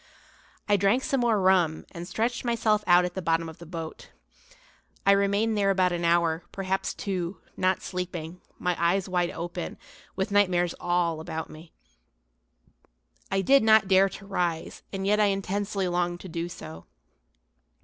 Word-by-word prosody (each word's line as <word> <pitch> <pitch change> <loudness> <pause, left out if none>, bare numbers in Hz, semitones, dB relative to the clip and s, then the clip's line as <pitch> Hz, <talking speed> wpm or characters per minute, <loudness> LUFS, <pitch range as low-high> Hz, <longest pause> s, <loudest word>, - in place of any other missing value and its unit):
I 205 -1 +4
drank 200 +7 +2
some 270 - 0
more 235 -3 +2
rum 185 -4 +2
and 170 +1 -7
stretched 235 +5 -1
myself 225 -3 +1
out 175 0 +6
at 180 - -4
the 190 - -4
bottom 165 -1 0
of 160 - -10
the 170 - -11
boat. 165 -1 -7 1.0
I 200 - +6
remained 200 +3 +2
there 200 -1 +2
about 185 -2 +3
an 175 0 -2
hour, 170 -1 +2
perhaps 190 0 -2
two, 185 -2 -3 0.2
not 185 0 +1
sleeping, 180 -2 -5 0.2
my 180 -1 0
eyes 180 +3 +2
wide 180 -2 0
open, 175 +1 -5 0.4
with 190 +1 -2
nightmares 180 -4 +3
all 175 -2 0
about 160 0 -5
me. 160 +2 -13 1.6
I 195 - +1
did 275 +7 +5
not 220 -2 +5
dare 195 0 +5
to 195 +1 -10
rise, 175 -4 -2
and 195 -1 -4
yet 210 +1 +3
I 210 - +5
intensely 195 0 -1
longed 175 0 -1
to - - -8
do 170 +1 -4
so. 80 - -10
185 Hz, 160 wpm, -27 LUFS, 170-200 Hz, 1.6 s, out